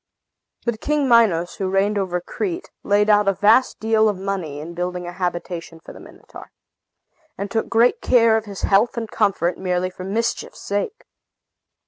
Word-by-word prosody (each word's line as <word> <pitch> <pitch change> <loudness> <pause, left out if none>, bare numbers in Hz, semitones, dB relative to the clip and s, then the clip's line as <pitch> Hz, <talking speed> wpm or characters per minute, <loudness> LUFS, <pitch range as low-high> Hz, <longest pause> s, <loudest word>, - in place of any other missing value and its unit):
But 235 -2 -2
King 300 -2 0
Minos, 210 -8 +3
who 190 -1 -2
reigned 195 +2 +1
over 180 -2 -1
Crete, 355 - -5
laid 205 +1 +2
out 210 -1 +4
a 195 - +4
vast 220 +7 +3
deal 220 0 +3
of 205 - -3
money 185 -7 -4
in 165 +3 -8
building 180 +1 -4
a 175 - -5
habitation 175 -2 -4
for - - -12
the - - -12
Minotaur, - - -14 0.9
and 200 0 -5
took 225 -1 -1
great 235 +2 +3
care 230 -3 +4
of 220 0 -1
his 200 -2 -8
health 210 +5 +2
and 225 -2 -4
comfort, 195 -5 0
merely 185 0 -1
for 185 - -9
mischief's 225 +5 -3
sake. 205 - -3
200 Hz, 170 wpm, -21 LUFS, 180-225 Hz, 0.9 s, out